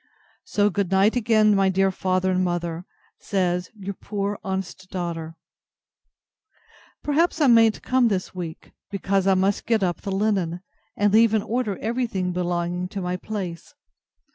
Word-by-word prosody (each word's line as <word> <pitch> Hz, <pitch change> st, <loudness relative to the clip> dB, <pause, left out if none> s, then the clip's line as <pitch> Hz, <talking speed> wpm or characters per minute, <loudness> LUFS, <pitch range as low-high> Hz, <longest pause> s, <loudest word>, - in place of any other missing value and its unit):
So 205 Hz, 0 st, +2 dB
good 195 Hz, 0 st, -1 dB
night 195 Hz, +4 st, +3 dB
again, 215 Hz, -3 st, +4 dB
my 195 Hz, -1 st, +3 dB
dear 190 Hz, +1 st, +2 dB
father 185 Hz, 0 st, 0 dB
and 185 Hz, 0 st, +1 dB
mother, 175 Hz, -1 st, -2 dB, 0.3 s
says 180 Hz, -2 st, -1 dB
Your 200 Hz, -1 st, -5 dB
poor 200 Hz, +1 st, -4 dB
honest 190 Hz, -1 st, -5 dB
DAUGHTER. 165 Hz, -3 st, -4 dB, 1.7 s
Perhaps 320 Hz, +4 st, +1 dB
I 300 Hz, -, +4 dB
mayn't 230 Hz, -3 st, +5 dB
come 255 Hz, -2 st, +3 dB
this 190 Hz, -4 st, -2 dB
week, 170 Hz, -3 st, -7 dB, 0.2 s
because 195 Hz, -1 st, 0 dB
I 195 Hz, -, +5 dB
must 190 Hz, +2 st, 0 dB
get 225 Hz, -3 st, +2 dB
up 175 Hz, -2 st, -1 dB
the 200 Hz, -, -4 dB
linen, 190 Hz, -4 st, 0 dB, 0.4 s
and 205 Hz, 0 st, +2 dB
leave 225 Hz, 0 st, +5 dB
in 215 Hz, -, +1 dB
order 225 Hz, -5 st, -1 dB
every 240 Hz, +3 st, -1 dB
thing 185 Hz, -4 st, -2 dB
belonging 175 Hz, 0 st, -2 dB
to 195 Hz, +1 st, -5 dB
my 180 Hz, 0 st, -2 dB
place. 180 Hz, -4 st, -6 dB
195 Hz, 155 wpm, -24 LUFS, 180-215 Hz, 1.7 s, mayn't